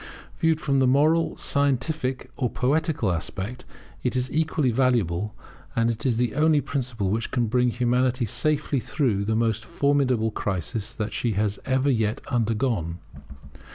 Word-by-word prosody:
Viewed 160 -2 +2
from 140 -3 +1
the 130 - +4
moral, 155 +5 +3
scientific, 140 -1 0
or 125 -3 -1
poetical 140 - 0
aspect, 95 +8 -4 0.4
it 125 0 -1
is 125 0 -1
equally 155 -4 +1
valuable; 110 -6 +1 0.4
and 115 +1 +2
it 115 +3 -2
is 120 -3 +1
the 120 0 0
only 155 +1 +3
principle 120 -9 -2
which 115 +2 -1
can 125 -2 0
bring 125 +2 +2
Humanity 125 +1 +1
safely 150 +4 0
through 120 -4 0
the 110 +1 0
most 115 -1 0
formidable 130 -5 +1
crisis 100 +3 -3
that 110 -1 -3
she 115 -3 0
has 105 0 -1
ever 130 +1 +2
yet 110 -3 0
undergone. 115 - 0
125 Hz, 150 wpm, -25 LUFS, 110-140 Hz, 0.4 s, the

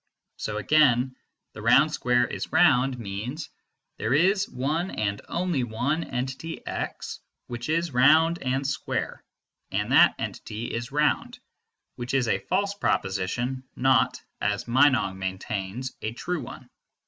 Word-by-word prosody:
So 105 0 -3
again 130 0 +3 0.4
"the - - -9
round 150 +2 +5
square 125 -3 +2
is - - -5
round" 125 +1 +4
means 115 +8 -5 0.5
"there 120 +4 +1
is 190 +5 +3
one 150 +8 -1
and 100 -1 -2
only 170 -6 0
one 125 +8 -1
entity 130 +6 -5
x - - -5 0.3
which 120 +3 -6
is 165 +1 0
round 160 +7 +5
and 135 +1 -1
square, 140 - -3 0.5
and - - -2
that - - +6
entity 110 +2 -5
is 115 +2 -4
round," 150 -1 +1 0.6
which 125 +2 -3
is 130 -3 +2
a - - +1
false 200 +2 -1
proposition, 120 - -1
not, 130 -2 +3 0.2
as 105 +1 -1
Meinong 125 -6 +3
maintains, 95 +5 -4
a 110 - -2
true 175 +6 -3
one. - - -10
130 Hz, 135 wpm, -26 LUFS, 115-155 Hz, 0.6 s, that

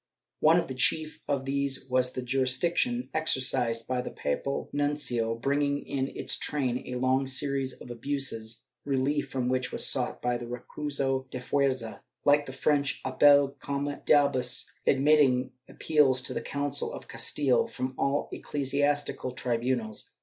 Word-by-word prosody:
One 160 +2 +5
of - - -3
the 130 - -5
chief 155 +4 0
of 140 -2 -1
these 140 -1 -1
was 125 0 +1
the 130 - -4
jurisdiction 135 - +1
exercised 130 -6 0
by 125 -1 0
the - - -5
papal 140 - -3
nuncio, 145 -6 0
bringing 140 +3 0
in 135 -1 -2
its - - -1
train 130 -4 -1
a 125 - -2
long 130 +1 +1
series 135 0 0
of 125 - -11
abuses, 120 -3 -3 0.2
relief 140 +1 0
from 130 -2 -2
which 130 0 0
was - - +1
sought - - +1
by 125 0 0
the 120 0 -7
recurso 135 +1 -2
de 130 - -5
fuerza, 130 -3 -1 0.3
like 145 0 +4
the - - -5
French 140 +1 0
appel 140 +1 +5
comme 140 +1 -3
d'ahus, 140 -4 +3 0.2
admitting 135 -2 +4 0.2
appeals 135 -5 +2
to - - -3
the - - -3
Council 140 -1 -2
of - - -9
Castile 140 -4 +1
from 130 0 -4
all 140 +2 0
ecclesiastical 145 -2 -1
tribunals. 120 -3 -2
135 Hz, 150 wpm, -28 LUFS, 125-145 Hz, 0.3 s, One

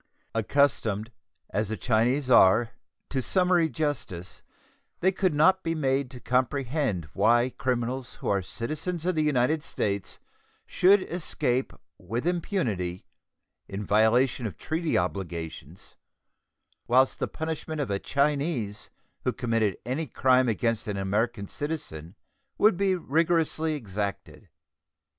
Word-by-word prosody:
Accustomed, 115 -3 +1 0.4
as 105 0 -1
the 110 - -3
Chinese 125 +4 +1
are, 115 -1 +5 0.4
to 135 - 0
summary 180 - +2
justice, 120 - -4 0.6
they 190 - +3
could 185 -4 0
not 185 +6 +4
be 165 -2 -2
made 135 -3 0
to 125 -1 -10
comprehend 130 - 0
why 120 +2 +3
criminals 125 +1 -2
who - - -7
are 100 -1 +2
citizens 155 - -4
of 185 - +2
the 155 - +1
United 150 +1 +2
States 100 - -3 0.5
should 190 +1 +4
escape 135 -7 -1 0.3
with 115 - -4
impunity, 115 - -1 0.6
in 100 +1 -5
violation 115 +4 +3
of 90 - -8
treaty 160 0 -1
obligations, 85 -3 -5 0.9
whilst 130 +2 +3
the - - -1
punishment 160 -1 -4
of 135 -8 -2
a 100 - 0
Chinese 140 -7 -1 0.3
who - - +1
had - - -5
committed 115 -5 0
any 140 +6 -2
crime 130 +1 +3
against 115 0 0
an 105 -1 -2
American 100 +2 -1
citizen 100 - -5 0.4
would 215 -2 +5
be 195 +1 +2
rigorously 160 -1 +1
exacted. 100 -4 -5
125 Hz, 125 wpm, -27 LUFS, 105-155 Hz, 0.9 s, are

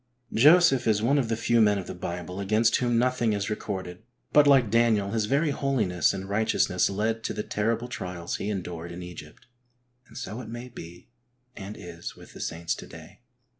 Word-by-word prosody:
10 125 - -48
HEART 120 - -46
TALKS 125 0 -47
ON 115 - -3
HOLINESS. 175 +6 +8
Joseph 135 -7 +2
is 105 -1 +3
one 135 +5 +3
of 120 -4 -1
the 115 - +1
few 115 0 +2
men 105 -1 +4
in 95 - -4
the - - -6
Bible 90 +1 -6
against 110 +3 +2
whom 120 -2 +1
nothing 120 -2 +1
is 100 +1 -2
recorded, 95 -3 -5 0.3
but 150 -1 +6
like 130 -7 +5
Daniel 110 -4 +3
his 110 -2 0
very 140 +7 +1
holiness 110 - +1
and 95 0 -5
righteousness 110 +2 +1
led 110 +3 -1
to - - -3
the 105 - -3
terrible 115 +3 -1
trials 90 -7 -5
he 100 - -3
endured 85 -4 -5
in 90 +1 -7
Egypt. 85 -4 -11 0.6
And - - -13
so 110 +6 -5
it 110 - -9
may 120 +2 -7
be 85 -6 -11 0.5
and 100 +1 -8
is 85 -1 -8
with - - -15
the - - -11
saints 85 0 -2
to - - -9
day. - - -13
110 Hz, 215 wpm, -27 LUFS, 90-120 Hz, 0.6 s, HOLINESS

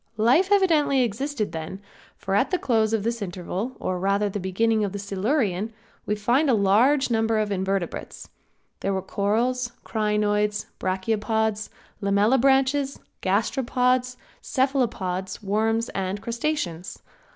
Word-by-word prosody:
Life 260 - +3
evidently 315 -9 +4
existed 240 +1 -2
then, 160 +4 -6 0.4
for 195 - -4
at 205 +7 +3
the 365 - +1
close 220 -8 +1
of 220 -3 0
this 230 0 -2
interval 190 +5 -4
or 185 -1 -2
rather 200 +2 +1
at 200 - -3
the 205 - -2
beginning 215 +4 +1
of 200 -2 -2
the - - -3
Silurian 205 - -1 0.4
we 210 - +1
find 245 +8 +2
a 245 - +5
large 240 +8 +3
number 225 -1 +2
of 215 -1 0
Invertebrates. 190 -2 -3 0.5
There 195 0 -1
were 190 - -2
corals, 235 +6 0
crinoids, 210 -1 0
brachiopods, 215 +3 -1 0.3
lamellibranches, 265 +7 +3 0.2
gasteropods, 250 +4 +1 0.2
cephalopods, 230 -10 -1
worms 220 +3 0
and 195 +1 -3
crustaceans. 230 - -3
215 Hz, 130 wpm, -24 LUFS, 195-250 Hz, 0.5 s, a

